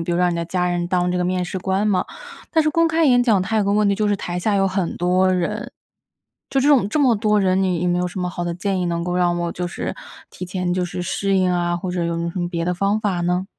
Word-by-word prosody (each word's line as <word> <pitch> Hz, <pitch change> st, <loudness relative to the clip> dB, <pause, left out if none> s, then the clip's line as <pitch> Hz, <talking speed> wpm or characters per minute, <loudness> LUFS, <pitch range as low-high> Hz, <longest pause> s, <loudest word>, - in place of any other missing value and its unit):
比 170 Hz, +1 st, -2 dB
如 -, -, +1 dB
让 180 Hz, -1 st, +3 dB
你 170 Hz, -, -2 dB
的 170 Hz, -, -2 dB
家 180 Hz, +1 st, -1 dB
人 175 Hz, 0 st, -1 dB
当 180 Hz, -1 st, +1 dB
这 180 Hz, -, -1 dB
个 180 Hz, -, 0 dB
面 180 Hz, 0 st, 0 dB
试 185 Hz, +1 st, -4 dB
官 190 Hz, +3 st, 0 dB
嘛。 195 Hz, -3 st, +1 dB, 0.5 s
但 320 Hz, -1 st, +3 dB
是 305 Hz, -, +1 dB
公 330 Hz, 0 st, +3 dB
开 325 Hz, 0 st, +2 dB
演 245 Hz, -3 st, +5 dB
讲 220 Hz, -6 st, +3 dB
它 220 Hz, +3 st, -2 dB
有 210 Hz, -, +2 dB
个 200 Hz, -, +1 dB
问 210 Hz, 0 st, +3 dB
题， 200 Hz, -, +2 dB
就 210 Hz, +1 st, 0 dB
是 205 Hz, -, +1 dB
台 175 Hz, -1 st, -4 dB
下 205 Hz, +3 st, 0 dB
有 195 Hz, 0 st, +3 dB
很 185 Hz, -2 st, -2 dB
多 185 Hz, +2 st, +2 dB
人， 210 Hz, +7 st, -2 dB, 0.8 s
就 270 Hz, -, +2 dB
这 285 Hz, -, +2 dB
种 255 Hz, -9 st, +4 dB
这 305 Hz, -, -1 dB
么 255 Hz, -5 st, +4 dB
多 210 Hz, 0 st, +2 dB
人， 190 Hz, 0 st, +2 dB
你 180 Hz, -3 st, 0 dB
有 180 Hz, -, +1 dB
没 175 Hz, 0 st, +1 dB
有 180 Hz, -, 0 dB
什 180 Hz, +2 st, -6 dB
么 180 Hz, -, -1 dB
好 175 Hz, -1 st, -4 dB
的 170 Hz, -1 st, -2 dB
建 190 Hz, 0 st, -2 dB
议， 180 Hz, -, -1 dB
能 170 Hz, 0 st, -1 dB
够 180 Hz, 0 st, -2 dB
让 175 Hz, -1 st, +1 dB
我 170 Hz, 0 st, -2 dB
就 180 Hz, 0 st, -3 dB
是 -, -, -5 dB, 0.4 s
提 -, -, -7 dB
前 180 Hz, -1 st, -2 dB
就 180 Hz, -1 st, 0 dB
是 180 Hz, 0 st, -5 dB
适 195 Hz, +2 st, -1 dB
应 185 Hz, -1 st, +2 dB
啊， 175 Hz, 0 st, 0 dB
或 180 Hz, +1 st, -4 dB
者 175 Hz, -1 st, -2 dB
有 170 Hz, 0 st, -1 dB
没 170 Hz, -, -2 dB
有 170 Hz, -, -2 dB
什 185 Hz, -, -6 dB
么 175 Hz, -1 st, -1 dB
别 170 Hz, -1 st, -3 dB
的 180 Hz, -, 0 dB
方 200 Hz, +4 st, +1 dB
法 195 Hz, -5 st, -1 dB
呢？ 180 Hz, +1 st, 0 dB
185 Hz, 330 characters per minute, -21 LUFS, 175-205 Hz, 0.8 s, 演